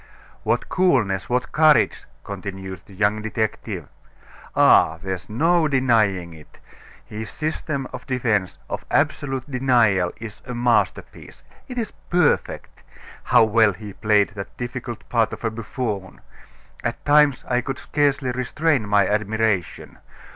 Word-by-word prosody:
"What - - 0
coolness, 120 - +1
what 125 0 -1
courage!" 155 -1 +4 0.2
continued 95 -2 -7
the 100 - -14
young 105 +2 +1
detective. 110 0 -3 0.7
"Ah! 80 - +5
there's 95 +1 -5
no 165 +8 +2
denying 110 - +1
it, 75 -1 -16 0.5
his 110 +1 -7
system 155 -3 -3
of - - -8
defense 110 -7 0
of - - -5
absolute 135 -2 0
denial 120 -9 +2
is 110 -2 -9
a 125 - -5
masterpiece. 120 0 -1 0.2
It 250 -2 -8
is 230 -2 -3 0.2
perfect. 175 -4 0 0.4
How - - +5
well 110 -1 +4
he 105 +1 -9
played 105 -1 +2
that 100 -1 -9
difficult 120 -2 -6
part 115 -2 +1
of - - -7
buffoon! 110 -4 -5 0.6
At - - -4
times 145 -2 +4
I 125 0 +1
could 135 +2 -4
scarcely 145 -3 0
restrain 130 0 0
my 100 -1 +4
admiration. 110 -3 -1
115 Hz, 125 wpm, -22 LUFS, 100-135 Hz, 0.7 s, Ah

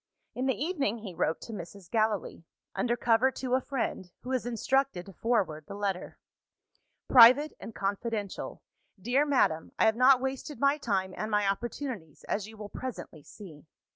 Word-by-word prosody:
In 255 +2 -2
the 260 -5 0
evening, 285 - -1
he 210 -5 -8
wrote 165 -1 0
to 230 - -8
Mrs. 185 -1 -9
Gallilee 215 -4 -1 0.3
under 240 -1 0
cover 235 +2 +3
to 255 -1 -3
a 260 - +3
friend, 235 -9 -3
who 250 - -8
was 255 -2 -1
instructed 245 -4 0
to 195 - -12
forward 185 -8 0
the - - -7
letter. 200 -3 -3 0.9
"Private 255 +5 +8
and 225 - -9
confidential. 205 +1 -3 0.4
Dear 250 +9 +1
Madam, 165 - +1
I - - +4
have 220 0 +4
not 255 +2 +6
wasted 265 +3 -4
my 280 +2 +3
time 190 -8 -1
and 215 - -3
my 210 -1 +2
opportunities, 220 - -4
as 205 0 -2
you 220 0 -13
will 210 -1 -7
presently 235 -10 -7
see. 160 -2 -13
225 Hz, 170 wpm, -29 LUFS, 195-260 Hz, 0.9 s, Private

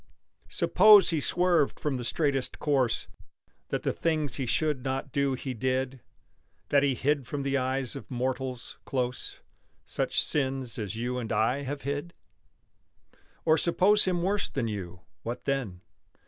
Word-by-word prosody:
Suppose 210 -3 +6
he 160 - +1
swerved 175 -1 +2
from 145 -3 -1
the 125 - -5
straightest 135 +2 -1
course 135 -6 +1 0.6
That - - -2
the - - 0
things 155 -3 -1
he 135 -3 -2
should 150 -1 0
not 135 0 -3
do 140 -2 +1
he 130 0 -5
did 130 +2 -2 0.7
That 140 - +4
he 140 -2 +2
hid 140 0 0
from 145 -1 -3
the 140 0 0
eyes 130 0 -1
of 140 - -9
mortals, 130 0 -3
close, 125 -2 -3 0.4
Such - - -1
sins 135 -4 -2
as 105 0 -4
you 125 +2 -2
and 115 -3 -5
I 125 +6 +1
have 140 +1 -5
hid? 145 +5 -4 1.3
Or 160 -1 +4
suppose 195 +6 +5
him 180 -2 0
worse 200 +2 0
than 125 -4 -2
you; 90 -5 -6 0.2
what 120 +2 -5
then? 120 -10 -2
135 Hz, 150 wpm, -28 LUFS, 125-150 Hz, 1.3 s, Suppose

